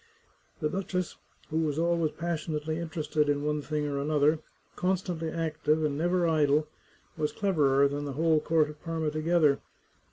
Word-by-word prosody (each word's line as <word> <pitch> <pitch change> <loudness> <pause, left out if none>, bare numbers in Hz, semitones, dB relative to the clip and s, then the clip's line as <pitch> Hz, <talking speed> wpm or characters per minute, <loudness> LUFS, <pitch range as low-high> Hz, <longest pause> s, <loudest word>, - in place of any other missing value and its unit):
The 155 - +2
duchess, 185 0 -3 0.3
who 160 - +1
was 155 -2 0
always 170 -1 +2
passionately 160 -2 -3
interested 155 -2 -1
in 145 0 +1
one 150 0 0
thing 150 0 -2
or 140 -1 -2
another, 150 +1 +2 0.4
constantly 180 -3 -1
active 155 -1 0
and 145 -2 0
never 175 +3 +1
idle, 150 -1 +3 0.5
was 150 -1 0
cleverer 140 -8 +3
than 145 +1 -3
the 140 - -4
whole 160 +2 +3
court 155 -1 +2
of 150 - -16
Parma 160 -2 -2
together. 155 -2 +3
155 Hz, 155 wpm, -29 LUFS, 150-165 Hz, 0.5 s, idle